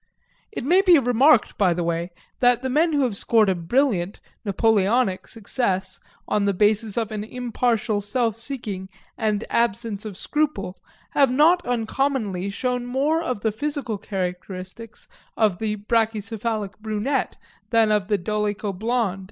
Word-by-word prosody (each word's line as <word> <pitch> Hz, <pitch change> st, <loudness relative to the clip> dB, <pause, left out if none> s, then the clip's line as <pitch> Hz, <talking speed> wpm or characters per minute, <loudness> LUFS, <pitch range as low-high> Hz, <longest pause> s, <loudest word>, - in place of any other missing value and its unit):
It 415 Hz, -, -5 dB
may 360 Hz, +6 st, +5 dB
be 360 Hz, -4 st, +6 dB
remarked 250 Hz, 0 st, +3 dB
by 185 Hz, -4 st, +3 dB
the 175 Hz, -, -1 dB
way, 170 Hz, +1 st, -1 dB, 0.3 s
that 245 Hz, -1 st, +3 dB
the 260 Hz, -, -1 dB
men 320 Hz, +5 st, +3 dB
who 285 Hz, -2 st, +2 dB
have 240 Hz, -6 st, 0 dB
scored 215 Hz, 0 st, +3 dB
a -, -, +3 dB
brilliant 190 Hz, +1 st, 0 dB, 0.2 s
(Napoleonic) 210 Hz, 0 st, +2 dB
success 195 Hz, -4 st, -2 dB, 0.3 s
on 205 Hz, -1 st, +1 dB
the 200 Hz, -1 st, +1 dB
basis 210 Hz, +2 st, +1 dB
of 225 Hz, -2 st, -1 dB
an 210 Hz, -1 st, -3 dB
impartial 235 Hz, -2 st, -1 dB
self 225 Hz, +2 st, 0 dB
seeking 225 Hz, -6 st, -5 dB, 0.3 s
and 215 Hz, -2 st, -1 dB
absence 230 Hz, -2 st, 0 dB
of 210 Hz, -4 st, -7 dB
scruple, 295 Hz, -11 st, -1 dB, 0.4 s
have 275 Hz, -3 st, +3 dB
not 325 Hz, +7 st, +4 dB
uncommonly 225 Hz, -5 st, -1 dB
shown 250 Hz, +3 st, -2 dB
more 285 Hz, +6 st, +1 dB
of 250 Hz, -10 st, -3 dB
the 220 Hz, -, +1 dB
physical 275 Hz, -2 st, -3 dB
characteristics 185 Hz, +3 st, -6 dB, 0.3 s
of 210 Hz, -5 st, +2 dB
the 215 Hz, -1 st, -1 dB
brachycephalic 220 Hz, -1 st, -1 dB
brunette 220 Hz, +5 st, -2 dB, 0.3 s
than 225 Hz, -2 st, +3 dB
of 210 Hz, -3 st, +1 dB
the 205 Hz, -1 st, +2 dB
dolicho 210 Hz, +1 st, -2 dB
blond. 220 Hz, -2 st, -1 dB
220 Hz, 145 wpm, -23 LUFS, 200-250 Hz, 0.4 s, be